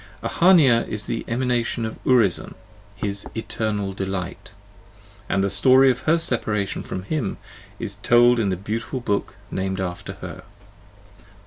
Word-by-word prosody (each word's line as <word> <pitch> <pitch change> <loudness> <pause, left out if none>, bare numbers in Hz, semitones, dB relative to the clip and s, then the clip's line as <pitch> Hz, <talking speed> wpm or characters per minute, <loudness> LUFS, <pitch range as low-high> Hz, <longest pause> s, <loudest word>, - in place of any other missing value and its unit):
Ahania 155 -10 +4
is 105 -1 -3
the 115 - -3
Emanation 120 -1 -1
of 110 - -7
Urizen, 115 -9 +2 0.4
his 100 0 -2
" - - -24
eternal 105 -3 -2
delight," 95 -1 -5 0.8
and 95 - +1
the - - +2
story 130 0 +6
of 125 - -4
her 165 - +5
separation 110 -9 -1
from 95 - -6
him 120 -2 -2 0.4
is 100 - -5
told 120 +1 +5
in 105 -3 +1
the 95 - -1
beautiful 115 +7 -4
book 105 -5 -2 0.2
named 95 0 -2
after 90 -2 -4
her. - - -9
110 Hz, 140 wpm, -23 LUFS, 100-125 Hz, 0.8 s, story